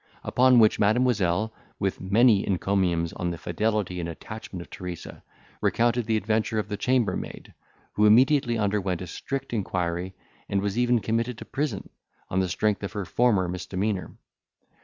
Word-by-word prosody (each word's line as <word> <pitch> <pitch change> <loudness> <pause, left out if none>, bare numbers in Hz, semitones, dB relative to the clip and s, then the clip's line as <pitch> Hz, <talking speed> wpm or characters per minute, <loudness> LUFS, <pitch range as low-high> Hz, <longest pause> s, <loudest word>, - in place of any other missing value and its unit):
Upon 130 0 +4
which 110 -2 +5
Mademoiselle, 110 -2 +2 0.2
with 95 -2 -2
many 105 +2 +4
encomiums 90 -3 0
on 90 - -2
the 85 - -4
fidelity 105 -2 -1
and 85 -1 -3
attachment 95 +1 -8
of - - -21
Teresa, 90 -2 -7 0.4
recounted 120 0 +1
the 110 -1 +2
adventure 110 +1 0
of 105 -1 -2
the 105 - -2
chambermaid, 125 +2 -1 0.4
who 105 +1 +4
immediately 125 +2 +4
underwent 100 -4 -1
a - - -5
strict 135 +9 -5
inquiry, 90 -3 -2 0.3
and 100 - +1
was 100 0 -2
even 120 -1 +2
committed 115 +3 -1
to - - -9
prison, 135 -8 -3 0.4
on 95 - 0
the 95 -1 0
strength 105 +3 0
of 100 - -5
her 100 -3 -3
former 105 -4 +2
misdemeanour. 95 +2 -3
105 Hz, 155 wpm, -26 LUFS, 95-115 Hz, 0.4 s, which